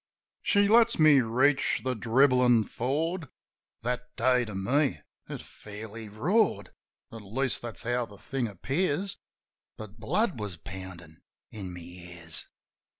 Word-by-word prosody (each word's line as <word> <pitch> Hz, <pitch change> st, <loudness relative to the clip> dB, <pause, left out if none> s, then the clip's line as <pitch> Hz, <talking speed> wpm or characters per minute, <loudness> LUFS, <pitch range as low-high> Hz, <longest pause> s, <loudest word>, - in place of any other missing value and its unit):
She 205 Hz, -1 st, +3 dB
lets 230 Hz, +2 st, +5 dB
me 155 Hz, -3 st, +7 dB
reach 130 Hz, +5 st, +2 dB
the 130 Hz, 0 st, 0 dB
dribblin' 125 Hz, 0 st, +4 dB
ford 155 Hz, +6 st, -2 dB, 0.3 s
— -, -, -63 dB
That 125 Hz, +1 st, -3 dB
day 125 Hz, -1 st, +3 dB
to 105 Hz, -3 st, -7 dB
me 135 Hz, +9 st, +1 dB, 0.3 s
it -, -, -6 dB
fairly 110 Hz, +1 st, -9 dB
roared. 115 Hz, -, +1 dB, 0.4 s
(At 115 Hz, -, -8 dB
least, 120 Hz, +6 st, -1 dB
that's 120 Hz, -2 st, -7 dB
how 120 Hz, 0 st, 0 dB
the 100 Hz, -, -14 dB
thing 125 Hz, +4 st, -2 dB
appears; 145 Hz, -, -1 dB, 0.6 s
But 110 Hz, 0 st, -10 dB
blood 170 Hz, -, 0 dB
was 100 Hz, -5 st, -4 dB
poundin' 85 Hz, -2 st, -10 dB, 0.3 s
in 100 Hz, -4 st, -6 dB
my 90 Hz, 0 st, -8 dB
ears.) 85 Hz, -1 st, -5 dB
120 Hz, 135 wpm, -29 LUFS, 100-140 Hz, 0.6 s, me